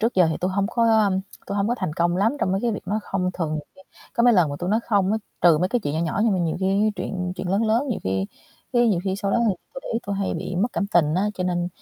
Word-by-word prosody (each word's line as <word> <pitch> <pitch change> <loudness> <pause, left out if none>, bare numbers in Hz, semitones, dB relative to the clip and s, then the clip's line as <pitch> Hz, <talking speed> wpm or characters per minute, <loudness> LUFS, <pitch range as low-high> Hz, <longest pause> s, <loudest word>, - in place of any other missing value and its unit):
trước 230 +2 +1
giờ 180 -2 +5
thì - - -1
tui 185 - 0
hông 195 +1 0
có 225 -3 +3 0.4
tui 200 - -3
hông 200 +1 +1
có 240 - +1
thành 185 -5 -2
công 175 +2 +1
lắm 210 +7 +2
trong 185 - +1
mấy 195 - 0
cái 240 - 0
việc 195 - -6
nói 215 +2 0
"không". 185 -2 -1
Thường 165 -4 -3
nhiều 155 - -2
khi 190 - -18 0.3
có 235 - +2
mấy 245 - +6
lần 180 -8 +3
mà 145 - -4
tui 175 +1 -2
nói 220 +2 +2
"không" 200 -2 +2
á, 220 - +1 0.2
trừ 170 -3 +6
mấy 180 +3 +1
cái 245 +2 0
chuyện 145 -6 -3
nhỏ 160 - 0
nhỏ 170 +4 -1
nhưng 225 - +3
mà 185 - +1
nhiều 165 -2 0
khi 195 +3 +2
chuyện 180 0 -3
chuyện 180 - -4
lớn 195 +4 +1
lớn 230 +6 +1
nhiều 235 - -2
khi 95 +1 0 0.5
cái 240 -1 +4
nhiều 190 -6 +2
khi 190 -1 -1
sau 200 0 -2
đó - - +2
thì 200 - +1 0.2
tui - - -6
để - - -8
ý 230 - +1
tui 200 0 -2
hay 195 -1 -1
bị 180 - -4
mất 205 +7 +2
cảm 200 - -1
tình 165 -6 +2
á. 195 +4 +1
Cho 185 - -3
nên 175 -1 0
195 Hz, 320 wpm, -23 LUFS, 175-215 Hz, 0.5 s, mấy